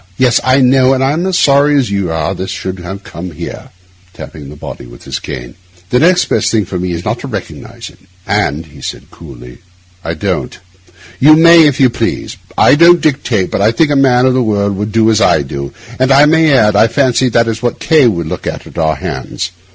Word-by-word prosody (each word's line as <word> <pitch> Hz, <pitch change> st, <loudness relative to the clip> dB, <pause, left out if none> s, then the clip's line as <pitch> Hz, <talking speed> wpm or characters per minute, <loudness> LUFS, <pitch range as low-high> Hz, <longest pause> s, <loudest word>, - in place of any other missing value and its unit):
Yes, 125 Hz, -2 st, +2 dB
I 130 Hz, +2 st, +3 dB
know; 130 Hz, +1 st, +3 dB
and 130 Hz, -, -1 dB
I'm 155 Hz, +7 st, 0 dB
as 185 Hz, -2 st, 0 dB
sorry 145 Hz, +1 st, +3 dB
as 125 Hz, -7 st, 0 dB
you 100 Hz, -3 st, -2 dB
are 80 Hz, +3 st, -2 dB
this 95 Hz, 0 st, -6 dB
should 95 Hz, 0 st, -5 dB
have 95 Hz, +3 st, -8 dB
come 85 Hz, +3 st, -8 dB
here,' 85 Hz, +1 st, -9 dB, 0.4 s
tapping 75 Hz, -3 st, -10 dB
the 75 Hz, -, -11 dB
body 70 Hz, -, -9 dB
with -, -, -15 dB
his -, -, -5 dB
cane. 60 Hz, -4 st, -8 dB, 0.4 s
'The 125 Hz, -, +3 dB
next 180 Hz, +4 st, +3 dB
best -, -, 0 dB
thing 110 Hz, -3 st, 0 dB
for 90 Hz, 0 st, -5 dB
me 90 Hz, 0 st, -3 dB
is 85 Hz, +1 st, -6 dB
not -, -, -2 dB
to -, -, -7 dB
recognise -, -, -8 dB
it; -, -, -24 dB, 0.3 s
and,' 75 Hz, +4 st, -1 dB
he 75 Hz, -2 st, -16 dB
added -, -, -8 dB
coolly, 60 Hz, -6 st, -13 dB, 0.4 s
'I 80 Hz, -, -3 dB
don't. 75 Hz, -, -3 dB, 0.6 s
You 155 Hz, +3 st, +6 dB
may, 165 Hz, 0 st, +6 dB
if 140 Hz, -, -1 dB
you 130 Hz, -3 st, +4 dB
please. -, -, -4 dB, 0.2 s
I -, -, +5 dB
don't 170 Hz, +3 st, +5 dB
dictate, 125 Hz, -10 st, -1 dB
but -, -, -2 dB
I 105 Hz, +2 st, +3 dB
think 145 Hz, +6 st, +1 dB
a -, -, +1 dB
man 130 Hz, -2 st, +3 dB
of 130 Hz, -, +2 dB
the 130 Hz, -, +1 dB
world 100 Hz, -3 st, -1 dB
would 105 Hz, +2 st, -4 dB
do 115 Hz, 0 st, +2 dB
as 110 Hz, 0 st, +1 dB
I 75 Hz, -, +3 dB
do; 70 Hz, 0 st, -6 dB, 0.3 s
and 130 Hz, +1 st, +1 dB
I 140 Hz, +2 st, +6 dB
may 160 Hz, 0 st, +3 dB
add, 105 Hz, -6 st, +3 dB
I 110 Hz, +2 st, +4 dB
fancy 130 Hz, +1 st, +1 dB
that 115 Hz, 0 st, +1 dB
is 115 Hz, 0 st, -3 dB
what 120 Hz, -1 st, -2 dB
K— 155 Hz, -6 st, +3 dB
would 85 Hz, -7 st, -1 dB
look 80 Hz, -, -6 dB
for -, -, -1 dB
at -, -, -9 dB
our 80 Hz, -1 st, +1 dB
hands. 70 Hz, +6 st, -5 dB
115 Hz, 230 wpm, -13 LUFS, 85-135 Hz, 0.6 s, You